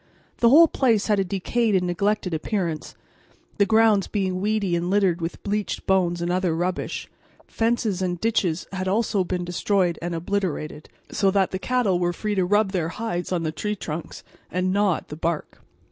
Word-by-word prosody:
The 235 Hz, -, +5 dB
whole 325 Hz, +6 st, +8 dB
place 230 Hz, -9 st, +2 dB
had 210 Hz, -2 st, +2 dB
a -, -, +3 dB
decayed 200 Hz, +4 st, 0 dB
and 180 Hz, -1 st, +2 dB
neglected 190 Hz, +1 st, 0 dB
appearance, 165 Hz, -1 st, -3 dB, 0.6 s
the 200 Hz, -, +4 dB
grounds 220 Hz, -3 st, +4 dB
being 185 Hz, -3 st, -1 dB
weedy 205 Hz, -3 st, 0 dB
and 170 Hz, +1 st, -1 dB
littered 190 Hz, -3 st, +2 dB
with 165 Hz, +1 st, -5 dB
bleached 205 Hz, 0 st, -2 dB
bones 175 Hz, -3 st, +1 dB
and 175 Hz, -, -1 dB
other 180 Hz, -2 st, +1 dB
rubbish: 175 Hz, +2 st, -2 dB, 0.4 s
fences 225 Hz, -4 st, 0 dB
and 175 Hz, -2 st, -1 dB
ditches 185 Hz, -7 st, 0 dB
had 190 Hz, -1 st, -3 dB
also 205 Hz, -1 st, +1 dB
been 180 Hz, 0 st, -3 dB
destroyed 175 Hz, -1 st, 0 dB
and 170 Hz, 0 st, -3 dB
obliterated, 165 Hz, -4 st, -3 dB, 0.2 s
so 195 Hz, -, +2 dB
that 190 Hz, -1 st, +2 dB
the 185 Hz, -, -3 dB
cattle 225 Hz, -6 st, +1 dB
were 175 Hz, 0 st, 0 dB
free 210 Hz, +4 st, -3 dB
to 190 Hz, -3 st, +1 dB
rub 205 Hz, +1 st, +2 dB
their 175 Hz, -4 st, -1 dB
hides 180 Hz, -3 st, -4 dB
on 175 Hz, -2 st, 0 dB
the 155 Hz, -, -1 dB
tree 210 Hz, +6 st, -3 dB
trunks 165 Hz, -4 st, -6 dB, 0.3 s
and 185 Hz, +1 st, 0 dB
gnaw 200 Hz, -3 st, +3 dB
at -, -, -9 dB
the 150 Hz, -, -6 dB
bark. 165 Hz, 0 st, -3 dB
190 Hz, 185 wpm, -24 LUFS, 175-210 Hz, 0.6 s, whole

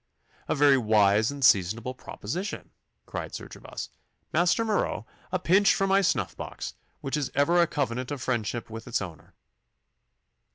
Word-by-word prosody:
'A -, -, +1 dB
very 140 Hz, -1 st, +5 dB
wise 105 Hz, -1 st, +4 dB
and 140 Hz, -2 st, 0 dB
seasonable 110 Hz, +5 st, +3 dB
proposition,' 170 Hz, -, -6 dB, 0.3 s
cried -, -, -5 dB
Sir -, -, -7 dB
Gervas. -, -, -8 dB, 0.4 s
'Master 180 Hz, +6 st, +3 dB
Marot, 210 Hz, -, 0 dB, 0.3 s
a 185 Hz, -, +1 dB
pinch 190 Hz, +3 st, +4 dB
from 195 Hz, 0 st, +1 dB
my 195 Hz, +1 st, +5 dB
snuff 185 Hz, -, 0 dB
box, -, -, -6 dB, 0.3 s
which 135 Hz, -, -2 dB
is 145 Hz, -3 st, -1 dB
ever 170 Hz, +5 st, +4 dB
a 170 Hz, -, +4 dB
covenant 130 Hz, -4 st, -2 dB
of 145 Hz, -, -4 dB
friendship 120 Hz, -2 st, -2 dB
with 115 Hz, 0 st, -8 dB
its -, -, 0 dB
owner. 85 Hz, -6 st, -9 dB
135 Hz, 155 wpm, -27 LUFS, 110-175 Hz, 0.4 s, very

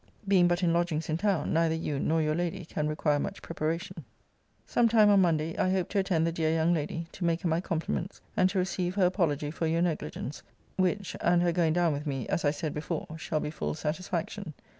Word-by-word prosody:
Being 185 Hz, -3 st, +5 dB
but 175 Hz, +1 st, +1 dB
in 170 Hz, -1 st, +3 dB
lodgings 170 Hz, -2 st, 0 dB
in 155 Hz, -, +1 dB
town, 190 Hz, -5 st, 0 dB
neither 165 Hz, 0 st, +2 dB
you 150 Hz, -3 st, -2 dB
nor 160 Hz, +2 st, +1 dB
your 155 Hz, 0 st, +1 dB
lady 170 Hz, +1 st, -2 dB
can 150 Hz, -1 st, -2 dB
require 150 Hz, -1 st, +1 dB
much -, -, -4 dB
preparation. 165 Hz, +2 st, -3 dB, 0.6 s
Some 235 Hz, -1 st, +3 dB
time 215 Hz, -2 st, +6 dB
on 200 Hz, -1 st, +6 dB
Monday 165 Hz, -2 st, +1 dB
I 185 Hz, -, +2 dB
hope 185 Hz, -2 st, 0 dB
to 200 Hz, -, +1 dB
attend 180 Hz, -4 st, +1 dB
the 165 Hz, -, +1 dB
dear 160 Hz, -1 st, 0 dB
young 165 Hz, +1 st, +2 dB
lady, 165 Hz, +1 st, -2 dB
to -, -, -7 dB
make 170 Hz, 0 st, +1 dB
her 185 Hz, -, -1 dB
my 165 Hz, +1 st, +1 dB
compliments; 170 Hz, +1 st, -3 dB, 0.2 s
and 185 Hz, 0 st, +4 dB
to 195 Hz, -, -3 dB
receive 185 Hz, -1 st, -1 dB
her 195 Hz, -3 st, +4 dB
apology 155 Hz, -6 st, 0 dB
for 165 Hz, +1 st, -2 dB
your 165 Hz, +2 st, +2 dB
negligence: 155 Hz, -4 st, -3 dB, 0.3 s
which, 190 Hz, +1 st, 0 dB
and 175 Hz, 0 st, +3 dB
her 175 Hz, -, +3 dB
going 165 Hz, -2 st, +2 dB
down 170 Hz, -2 st, +2 dB
with 145 Hz, +2 st, -4 dB
me, 135 Hz, -4 st, -3 dB
as -, -, 0 dB
I 145 Hz, -, +4 dB
said 150 Hz, +1 st, -3 dB
before, 155 Hz, +1 st, -4 dB
shall 155 Hz, -, -1 dB
be 150 Hz, -, -3 dB
full 155 Hz, -, -3 dB
satisfaction. 165 Hz, +2 st, -3 dB
165 Hz, 225 wpm, -29 LUFS, 155-180 Hz, 0.6 s, time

